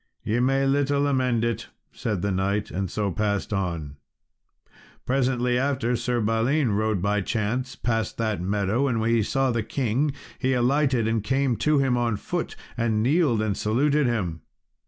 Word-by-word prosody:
"Ye 115 +3 0
may 135 +2 +2
little 140 +1 +2
amend 130 -4 +1
it," 115 -1 -2 0.2
said 105 -6 -3
the 100 - 0
knight, 100 +3 -1
and 95 0 -2
so 100 +1 -1
passed 105 +1 -1
on. 85 -7 -3 1.1
Presently 125 -2 +1
after 130 -3 0
Sir 120 0 -1
Balin, 115 +5 +1
rode, 105 -2 0
by 105 0 +1
chance, 120 +6 -2
past 115 -4 -2
that 110 -5 -1
meadow, 100 +7 0
and 115 -4 0
when 115 +1 +1
he 115 -1 +3
saw 135 +4 +1
the 115 -1 0
king 135 +4 0 0.3
he 130 -1 +1
alighted 130 -1 +2
and 115 -2 0
came 135 +2 +1
to 150 -1 +2
him 135 -3 +2
on 120 -3 0
foot, - - -4 0.2
and 110 -2 +1
kneeled 135 -5 +2
and 105 -2 0
saluted 140 +7 +2
him. 90 -9 -2
115 Hz, 165 wpm, -25 LUFS, 105-130 Hz, 1.1 s, he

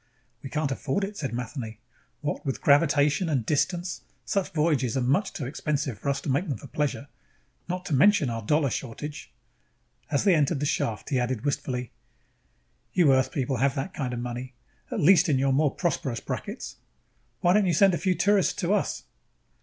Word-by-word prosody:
"We 135 - -7
can't 150 0 -1
afford 135 +8 -1
it," 200 +2 -4
said 145 -9 -3
Matheny. 120 -1 -5 0.4
"What 145 -1 -3
with 135 -3 -2
gravitation 145 +3 +3
and 130 -7 0
distance, 175 +6 -1 0.2
such 195 -2 -1
voyages 150 -6 +1
are - - +1
much 145 +11 +1
too 140 - -5
expensive 140 -3 -2
for 140 - -2
us 140 0 0
to - - -5
make 150 +7 0
them 135 - -1
for - - -12
pleasure. 145 -1 -2 0.6
Not 180 0 -3
to 170 - -2
mention 190 +2 +5
our 115 -1 -3
dollar 145 +4 +1
shortage." 145 +5 -6 0.8
As 140 - +1
they 195 -2 +5
entered 150 -1 +2
the 145 - -1
shaft, 115 -5 -1
he 130 - +2
added 125 0 -2
wistfully: 125 -3 -2 1.0
"You 165 -7 +5
Earth 130 0 +2
people 135 -2 -1
have 135 +2 +2
that 180 +8 -3
kind 135 -7 -3
of 120 - -3
money, 125 +1 -5 0.3
at - - -3
least 180 +2 +5
in 140 - +3
your 135 0 +2
more 145 +2 +3
prosperous 135 - -2
brackets. - - -6 0.6
Why 175 - +4
don't 205 -1 +3
you 175 - +2
send 195 +3 +5
a 170 - 0
few 185 -2 +1
tourists 200 +1 +3
to 180 +1 0
us?" 210 - -1
145 Hz, 190 wpm, -26 LUFS, 130-170 Hz, 1.0 s, mention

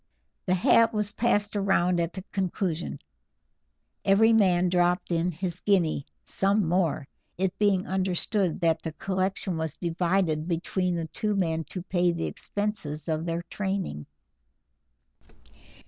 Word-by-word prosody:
The 185 - +3
hat 225 +5 +4
was 210 -1 0
passed 210 -3 0
round 180 -3 +2
at 170 0 -1
the 190 - -7
conclusion: 180 -3 -2 1.1
Every 220 +3 +5
man 185 -5 +4
dropped 180 +1 +1
in 170 +1 +1
his 175 +1 -4
guinea, 170 -8 +1 0.2
some 200 -1 +1
more, 165 -5 0 0.3
it 190 +1 0
being 200 -3 +2
understood 190 0 0
that 165 -1 +2
the 160 - -5
collection 190 0 -2
was 160 -1 -3
divided 170 -2 0
between 180 +1 -1
the 165 -1 -2
two 210 +6 -2
men 165 -4 0
to 180 - -6
pay 180 -2 +1
the 170 -1 -3
expenses 200 -8 -4
of 160 0 -1
their 170 +1 -2
training. 190 - -3
180 Hz, 130 wpm, -27 LUFS, 165-195 Hz, 1.1 s, Every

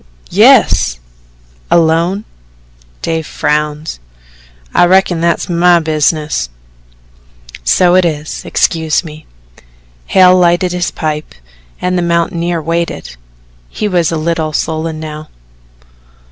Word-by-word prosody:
"Yes." - - +4 0.7
"Alone?" 170 +5 +2 0.8
Dave 160 -1 -2
frowned. 150 - -2 0.7
"I - - +5
reckon 185 -2 +2
that's 170 0 0
my 175 0 +3
business." 155 - -1 1.1
"So 175 - +3
it 185 0 +4
is 155 -2 -3
excuse 160 0 0
me." 155 -2 -11 0.8
Hale 185 -1 +5
lighted 175 0 +2
his 180 0 -1
pipe 155 - -4 0.4
and 180 0 -1
the - - 0
mountaineer 170 0 -1
waited 165 - -3 0.5
he 210 - -3
was 175 -5 +1
a 165 - -1
little 160 -1 -2
sullen 160 +1 -2
now. 155 0 -8
165 Hz, 105 wpm, -13 LUFS, 155-175 Hz, 1.1 s, I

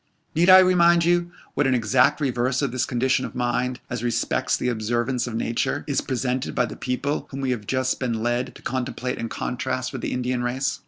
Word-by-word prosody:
Need 170 +3 +3
I 185 - +11
remind 175 -2 +5
you 175 0 +2 0.2
what 145 - +1
an 130 - +3
exact 125 +5 +3
reverse 130 -1 0
of 135 - 0
this 130 0 -1
condition 130 +1 +1
of - - -6
mind, 125 +1 -1
as 125 -2 -4
respects 120 -1 0
the - - -2
observance 120 +2 -1
of 115 - -5
nature, 115 +5 -1
is 140 - 0
presented 130 0 -2
by 125 - +2
the 115 - -7
people 140 +4 -2
whom 135 - -6
we 130 -1 0
have 110 -5 -4
just 130 0 0
been 115 -4 -2
led 120 +2 -1
to - - -14
contemplate 125 0 -3
in 115 - -3
contrast 130 +1 -3
with 130 - -5
the - - -3
Indian 125 0 -1
race? 130 +2 -1
125 Hz, 210 wpm, -24 LUFS, 120-135 Hz, 0.2 s, I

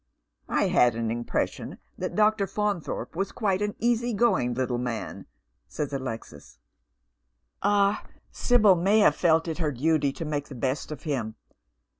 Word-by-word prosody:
" - - -54
I - - +1
had 120 -2 +4
an 115 -1 -2
impression 120 +1 -3 0.2
that - - -4
Dr. 215 -1 +3
Faunthorpe 205 -4 -3
was 195 - -2
quite 200 -4 0
an 210 0 -1
easy 240 0 0
going 160 - +2
little 125 -1 -1
man," 120 -3 -5 0.4
says 145 -2 -4
Alexis. 115 - -6 0.5
" - - -51
Ah, 205 0 +2 0.3
Sibyl 215 -6 +4
may 195 +5 +3
have - - +5
felt 165 -1 +2
it 160 +1 -4
her 155 -3 0
duty 145 +2 +1
to 165 - -6
make 145 -1 -3
the 140 - -9
best 130 +5 -2
of 150 - -7
him. 125 -9 -3
155 Hz, 160 wpm, -26 LUFS, 125-205 Hz, 0.5 s, have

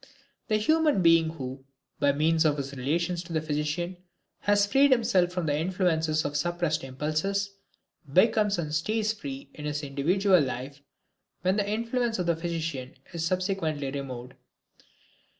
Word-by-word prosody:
The 215 - +2
human 305 - +3
being 165 -1 +5
who, 135 -4 -7 0.4
by 145 - +4
means 160 +3 +2
of 150 -2 +2
his 140 0 -4
relations 170 +7 -1
to 170 -1 -9
the 160 - +2
physician, 155 +4 -2 0.4
has 205 0 +3
freed 275 +7 +4
himself 195 -8 +3
from 180 -2 -2
the 145 -2 +1
influences 160 -2 +1
of 145 - -3
suppressed 170 0 0
impulses, 155 +9 -1 0.6
becomes 210 - +4
and 155 -3 -3
stays 215 +7 0
free 140 -8 -8
in 150 - -8
his 150 0 -2
individual 180 +8 +3
life, 135 +1 -4 0.6
when 185 +2 +2
the 205 -1 0
influence 230 +2 0
of 180 - -1
the 170 -1 +2
physician 165 -6 -4 0.2
is 165 -1 -3
subsequently 165 -6 -1
removed. 130 -3 -6
165 Hz, 150 wpm, -27 LUFS, 145-195 Hz, 0.6 s, being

